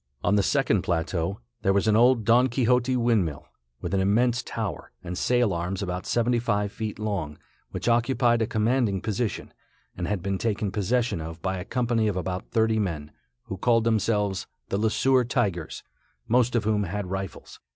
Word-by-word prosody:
On 90 - +2
the 105 - +4
second 120 -4 +2
plateau, 85 0 -2 0.2
there 95 - +2
was 100 +2 +1
an 105 - +4
old 120 -1 +4
Don 120 +4 +5
Quixote 125 +1 +2
windmill, 110 - 0 0.3
with - - -4
an 95 - +2
immense 120 +5 +2
tower 110 - -5
and 90 +1 -5
sail 120 -1 +2
arms 90 +3 -3
about 90 -1 -4
seventy 120 0 +2
five 105 -3 0
feet 110 -1 -5
long, 100 -9 -3 0.3
which - - -5
occupied 120 0 +3
a 110 - +1
commanding 110 -2 +1
position, 110 +3 -3 0.4
and 90 -1 -3
had 95 -2 -2
been 100 0 -1
taken 105 -3 -1
possession 110 0 0
of 80 +1 -7
by 95 0 -1
a 90 - -6
company 120 -2 0
of 100 -3 -1
about 90 +1 -4
thirty 110 -1 +2
men, 80 -7 -3 0.3
who 95 - -6
called 115 +3 +3
themselves 105 -3 0 0.2
the 100 - -1
Le 110 +1 +2
Sueur 130 +4 +3
Tigers, 100 - -2 0.4
most 125 +1 +2
of 120 - +2
whom 105 -1 +1
had 100 +2 -3
rifles. 95 -1 -6
105 Hz, 180 wpm, -26 LUFS, 95-120 Hz, 0.4 s, Don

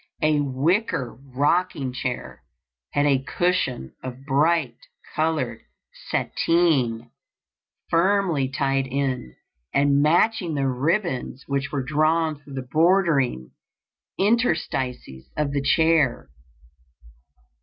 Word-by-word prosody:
A 155 -1 +3
wicker 140 - 0 0.2
rocking 145 -2 +1
chair 125 -1 -5 0.5
had 145 - +2
a 135 -2 +3
cushion 145 - -1
of 130 +1 -8
bright 145 -2 +2 0.4
colored 150 -8 -1 0.5
satine 130 -9 +1 0.8
firmly 170 -5 +2
tied 135 0 0
in, 130 - -2 0.4
and 140 0 +3
matching 175 +2 +2
the 135 -1 0
ribbons 135 0 -1
which 140 -1 -2
were 140 -3 -2
drawn 155 +2 +1
through 145 -1 -13
the 130 -1 -5
bordering 155 - +2 0.7
interstices 160 - -1
of 150 -2 0
the 140 0 -1
chair. 145 - +2
145 Hz, 95 wpm, -24 LUFS, 130-165 Hz, 0.8 s, A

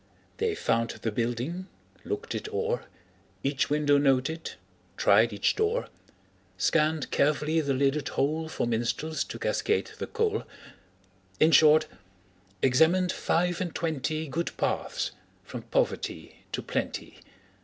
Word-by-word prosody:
They 445 -2 0
found 115 - +1
the 115 - -3
building, 120 - -2 0.4
looked 420 +3 -4
it 430 - -4
o'er, 460 +3 -1 0.6
Each 140 0 0
window 145 -1 +3
noted, 140 +4 +1 0.4
tried 110 +3 +5
each 100 -1 +1
door, 440 +3 0 0.7
Scanned 155 -1 +1
carefully 150 +2 +2
the 140 -3 0
lidded 140 +1 +1
hole 155 +3 -1
For - - -1
minstrels 120 +7 -1
to - - -7
cascade 435 - 0
the - - -3
coal 440 -1 0 1.0
In 160 - +5
short, 155 +1 +7 0.8
examined 165 +7 +4
five 175 +1 0
and 175 -3 -3
twenty 155 -1 -2
Good 165 +5 -3
paths - - -1 0.3
from - - -7
poverty - - -2
to - - -3
plenty. - - -4
155 Hz, 120 wpm, -28 LUFS, 135-180 Hz, 1.0 s, short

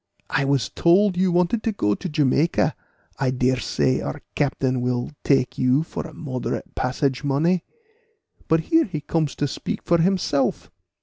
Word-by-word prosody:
I 135 +2 +1
was 135 -5 +1
told 185 +3 +3
you 185 0 +2
wanted 180 +6 +2
to 225 - 0
go 105 - 0
to 185 - -5
Jamaica; 150 +1 +2 0.4
I 135 -1 +1
dare 125 0 +1
say 125 +5 0
our 145 - -5
captain 130 -3 0
will 125 +1 -1
take 135 -3 +1
you 130 +4 +3
for 165 - -6
a 160 - -13
moderate 130 -6 -4
passage 130 +1 -1
money. 160 +6 +1 0.8
But 160 0 +3
here 325 - +3
he 160 -7 -5
comes 155 -1 -1
to 145 - -1
speak - - -5
for 170 0 +2
himself. 165 -5 0
145 Hz, 165 wpm, -23 LUFS, 130-170 Hz, 0.8 s, told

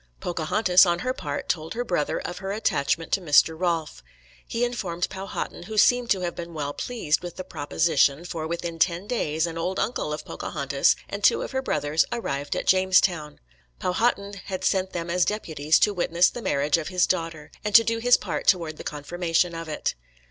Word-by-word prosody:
Pocahontas, 180 +3 +3
on 175 0 +2
her 255 - +1
part, 145 - -5
told 160 +3 -2
her 245 +1 -2
brother 175 -8 -1
of 175 0 -6
her 195 0 -4
attachment 165 -6 0
to 195 - +2
Mr. 160 0 +4
Rolfe. 165 - -2 0.5
He 235 +1 0
informed 185 -8 -2
Powhatan, 195 -2 -5
who 220 - -6
seemed 245 +2 +4
to 190 - +2
have 175 -1 -2
been 170 -1 -8
well 145 -1 -3
pleased 215 -10 -1
with 175 -1 -7
the 185 - -6
proposition, 150 -1 +1
for 160 -2 -4
within 170 0 -4
ten 170 +2 +1
days 160 -9 -1
an 165 -1 -5
old 180 +3 -2
uncle 220 -9 -1
of 150 - -5
Pocahontas 140 -2 0
and 200 0 -6
two - - +4
of - - -6
her 265 0 -1
brothers 150 - +1
arrived 145 -12 -3
at - - -3
Jamestown. 185 -5 +2 0.4
Powhatan 200 0 -1
had 185 -1 -5
sent 190 0 +1
them 170 -1 -3
as 180 0 +3
deputies 160 -8 +1
to 210 - +3
witness 175 -1 +2
the 240 - -7
marriage 145 -3 +1
of 155 - -5
his 180 -1 +2
daughter, 165 -4 -3
and 210 0 -1
to 230 - +10
do 230 0 -1
his 245 +1 +5
part - - -4
toward 165 -5 +2
the - - -8
confirmation 170 +3 -1
of 165 -1 -6
it. 155 - -2
175 Hz, 195 wpm, -25 LUFS, 155-195 Hz, 0.5 s, to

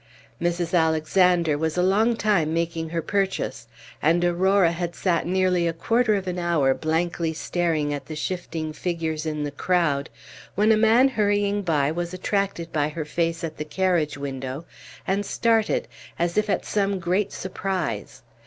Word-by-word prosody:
Mrs. 175 0 -1
Alexander 160 0 +3
was 160 +1 -1
a 180 - +3
long 215 +5 +3
time 185 -8 +1
making 165 -1 -2
her 165 0 -2
purchase, 190 - -2 0.3
and 170 +4 +3
Aurora 185 +1 +3
had 170 0 -4
sat 170 -3 0
nearly 180 -1 +2
a 165 - 0
quarter 225 +6 +2
of 195 -1 -2
an 180 0 -2
hour 165 -6 +2
blankly 165 +2 -1
staring 160 -3 -1
at 145 - -6
the 155 - -6
shifting 160 -1 -4
figures 160 -2 -3
in 150 -1 -2
the 145 - -3
crowd, 145 -3 0 0.5
when 210 +3 +4
a - - +6
man 225 +5 +5
hurrying 205 -3 +1
by 150 -6 +1
was 175 +2 -3
attracted 190 -3 -2
by 150 -1 +1
her 155 0 -5
face 165 +2 -1
at 160 -1 -4
the - - -3
carriage 160 -2 0
window, 135 +1 -5 0.4
and 195 +2 0
started, 225 +1 +1 0.3
as 170 0 0
if 215 0 +1
at - - 0
some 200 -1 0
great 185 +3 0
surprise. 185 - -4
170 Hz, 160 wpm, -24 LUFS, 160-190 Hz, 0.5 s, a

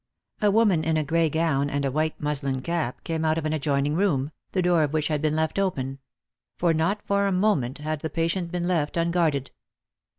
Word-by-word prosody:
A 210 - +4
woman 200 -6 +3
in 160 0 +1
a 155 - +1
gray 165 +2 +2
gown 145 -3 +1
and 145 0 -1
a 155 +4 0
muslin 140 -3 -2
cap 170 -7 -2
came 160 -1 -2
out 155 0 +2
of 160 - -2
an 155 - 0
adjoin 140 -2 0
ing 145 - 0
room, 155 -6 +1 0.2
the 185 - 0
door 175 -2 +3
of 150 -1 0
which 155 0 0
had 150 -2 0
been 155 -1 +1
left 160 +4 0
open; 135 -9 -2 0.6
for 170 -2 +2
not 185 +6 0
for 200 0 +2
a - - +1
moment 180 - +1
had 155 +1 -3
the 160 - -3
patient 165 +2 -1
been 175 -1 -2
left 165 -4 0
unguarded. 165 -5 +1
160 Hz, 210 wpm, -25 LUFS, 145-175 Hz, 0.6 s, A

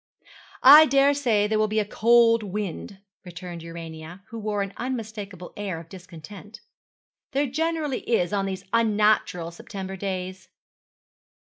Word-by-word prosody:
'I 300 +4 +10
daresay 275 -6 +3
there 215 +1 0
will 215 - +2
be 215 +1 0
a 210 - 0
cold 230 +2 +4
wind,' 200 -1 -5 0.3
returned 180 -1 -9
Urania, 165 +2 -9
who 230 - -7
wore 210 -1 -2
an 195 0 -7
unmistakable 215 -7 -6
air 195 -5 -4
of 165 0 -13
discontent. 190 +4 -12 0.7
'There 280 +2 +1
generally 310 0 -2
is 205 -5 +1
on 195 -1 0
these 190 0 -6
unnatural 210 -6 +1
September 190 +2 -8
days.' 185 -1 -5
205 Hz, 130 wpm, -24 LUFS, 185-230 Hz, 0.7 s, I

